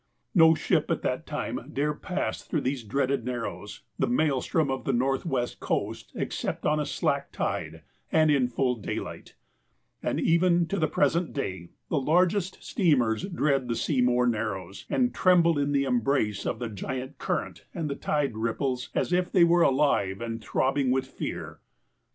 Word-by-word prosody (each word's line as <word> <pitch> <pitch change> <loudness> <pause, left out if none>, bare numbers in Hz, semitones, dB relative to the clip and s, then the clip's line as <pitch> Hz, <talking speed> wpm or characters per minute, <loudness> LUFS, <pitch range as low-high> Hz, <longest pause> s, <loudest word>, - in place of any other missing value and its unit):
No 160 -4 +7
ship - - +1
at - - -1
that - - -2
time - - -3
dared 150 +2 -1
pass 185 +1 -2
through 155 - -2
these 130 -2 -2
dreaded 135 +3 0
narrows, 115 -3 -5 0.2
the - - +2
maelstrom 155 - +1
of 135 - -3
the 135 - 0
northwest 130 0 0
coast, - - -3
except - - -3
on 150 0 +2
a 150 - -1
slack 140 -1 -1
tide, 80 -1 -3 0.3
and 155 -1 +4
in 135 -4 +3
full 125 +1 0
daylight; 105 - -6 0.7
and - - -1
even, 170 +1 +3
to 200 - -1
the 160 - +2
present 165 +4 +1
day, 95 -10 -4 0.2
the 150 - +1
largest 180 +5 +1
steamers 125 - +2
dread 145 -8 0
the 120 - -1
Seymour 125 -1 +2
Narrows, 105 -4 -3
and 250 -1 +1
tremble 170 -4 +4
in 145 0 0
the 140 -1 +2
embrace 125 -4 0
of - - -1
the 120 0 -4
giant 130 +6 -5
current - - -3
and 150 -4 -4
tide 145 -6 0
rip 115 +1 -1
ples 125 -3 -2
as - - 0
if 180 0 +1
they 180 - +5
were 170 +1 +5
alive 130 - +2
and 115 -1 -5
throbbing 135 0 +1
with 130 +1 +1
fear. 130 - -6
135 Hz, 165 wpm, -27 LUFS, 120-160 Hz, 0.7 s, No